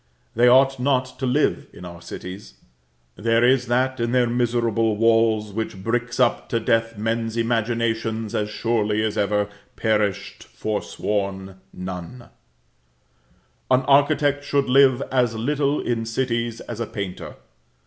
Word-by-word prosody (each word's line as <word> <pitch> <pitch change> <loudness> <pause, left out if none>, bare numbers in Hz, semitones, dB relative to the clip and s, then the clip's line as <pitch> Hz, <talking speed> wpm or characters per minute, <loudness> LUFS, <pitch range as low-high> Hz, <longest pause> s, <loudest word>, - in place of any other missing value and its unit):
They 120 +2 +4
ought 135 +1 +5
not 130 -1 0
to 130 - -1
live 140 +5 +1
in 90 - -11
our 85 -1 -10
cities; 90 +3 -9 0.6
there 115 +2 +2
is 125 0 +3
that 130 +2 0
in 115 +1 -1
their 125 -1 +4
miserable 115 -2 0
walls 115 -2 +2
which 105 -3 -4
bricks 120 +2 -2
up 120 -2 +1
to 115 - 0
death 115 0 0
men's 115 +1 -2
imaginations, 115 -1 -1
as 105 0 -1
surely 110 -1 0
as 110 -1 -1
ever 105 0 +1 0.3
perished 100 -3 -1
forsworn 100 -2 -3
nun. 90 +6 -8 1.4
An 130 0 +4
architect 145 0 +3
should 140 -1 +1
live 135 0 +4
as 125 -3 +1
little 140 +5 0
in 115 -2 -2
cities 115 -1 -2
as 120 -2 -7
a 115 - -2
painter. 100 -5 -6
115 Hz, 135 wpm, -22 LUFS, 105-125 Hz, 1.4 s, ought